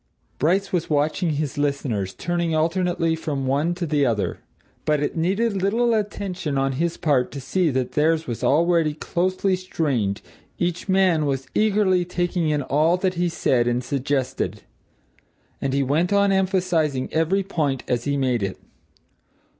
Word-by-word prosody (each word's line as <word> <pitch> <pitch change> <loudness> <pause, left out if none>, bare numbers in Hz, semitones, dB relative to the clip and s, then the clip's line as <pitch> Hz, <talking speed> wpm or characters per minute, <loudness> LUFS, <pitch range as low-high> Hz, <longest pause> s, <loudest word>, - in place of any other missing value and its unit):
Bryce 190 +7 +1
was 175 -3 0
watching 155 +3 +1
his 145 0 -3
listeners, 130 -10 -1
turning 170 -1 -1
alternately 165 0 +1
from 145 -4 -3
one 145 +6 +1
to 175 -1 -3
the 150 -2 +1
other. 105 -8 0 0.4
But 150 -1 +1
it 145 - -2
needed 195 +5 0
little 230 +5 +2
attention 195 -8 -2
on 135 0 +1
his 165 +6 -1
part 140 -6 +1
to 140 - -5
see 175 +6 0
that 130 -2 -1
theirs 160 +4 +2
was 120 -2 -5
already 165 0 +3
closely 185 +4 0
strained; 140 - -1 0.3
each 175 +2 -2
man 185 -5 +3
was 135 -1 -1
eagerly 200 -4 +3
taking 175 -2 -1
in 150 -2 0
all 155 +6 +2
that 185 0 0
he 175 0 0
said 120 -7 +1
and 120 +1 0
suggested. 130 -6 -2 1.0
And 135 - -1
he 140 +1 +1
went 155 +7 +1
on 200 0 +3
emphasizing 180 -8 +1
every 165 +5 +2
point 150 -9 -1
as 120 -1 -1
he 140 0 0
made 130 -4 +1
it. 95 -1 -3
160 Hz, 155 wpm, -23 LUFS, 135-180 Hz, 1.0 s, already